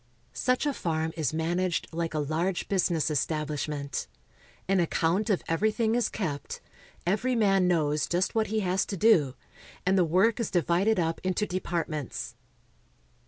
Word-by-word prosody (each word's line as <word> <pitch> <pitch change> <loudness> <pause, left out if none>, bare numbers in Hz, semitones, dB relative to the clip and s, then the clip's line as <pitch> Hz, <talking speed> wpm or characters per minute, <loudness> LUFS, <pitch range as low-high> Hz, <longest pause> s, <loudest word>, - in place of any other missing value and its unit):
Such 255 - +1
a 290 - +1
farm 160 -6 -2
is 155 -6 -1
managed 170 +2 -1
like 165 -1 -3
a 150 -1 0
large 170 +5 -1
business 175 -5 +1
establish 150 0 -1
ment. 140 -2 -4 0.6
An 195 0 +3
account 175 +5 +1
of 200 - +1
everything 220 +6 +1
is 240 0 +1
kept, 150 -9 -4 0.5
every 220 +8 +1
man 195 -5 +3
knows 155 -4 +1
just 175 +2 0
what 220 -1 +1
he 220 +1 0
has 185 0 +1
to 200 - -4
do, 160 - +4 0.5
and 190 +1 +3
the - - +5
work 190 +8 +3
is 230 - -1
divided 180 +4 +2
up 165 -1 -1
into 185 +3 0
departments. 170 - -3
175 Hz, 155 wpm, -28 LUFS, 160-200 Hz, 0.6 s, the